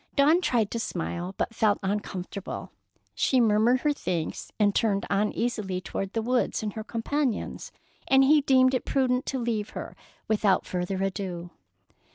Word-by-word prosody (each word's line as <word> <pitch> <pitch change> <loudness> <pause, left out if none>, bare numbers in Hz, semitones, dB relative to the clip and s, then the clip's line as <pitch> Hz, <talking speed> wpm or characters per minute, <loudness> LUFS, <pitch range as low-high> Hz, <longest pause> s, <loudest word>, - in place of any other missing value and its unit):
Dawn 300 +5 +5
tried 230 - +1
to 230 - -2
smile, 175 -1 -4
but - - -2
felt 215 -2 +2
uncomfortable. 195 -1 -4 0.4
She 260 - +2
murmured 230 +2 +4
her 300 -1 +2
thanks 170 - -3
again, - - -31
and 205 -1 +4
turned 200 -3 +1
uneasily 210 -1 0
toward 195 +2 -5
the 225 - -1
woods 245 -1 0
and 210 -2 -3
her 220 - -5
companions, 240 +2 -2 0.4
and 270 0 +6
he 295 +2 +5
deemed 260 -1 +4
it 255 - 0
prudent 255 -2 +1
to 270 - -1
leave 230 -4 -2
her - - -6 0.3
without 210 -3 +2
further 185 +1 -2
ado. 185 -3 -4
220 Hz, 160 wpm, -27 LUFS, 195-255 Hz, 0.4 s, and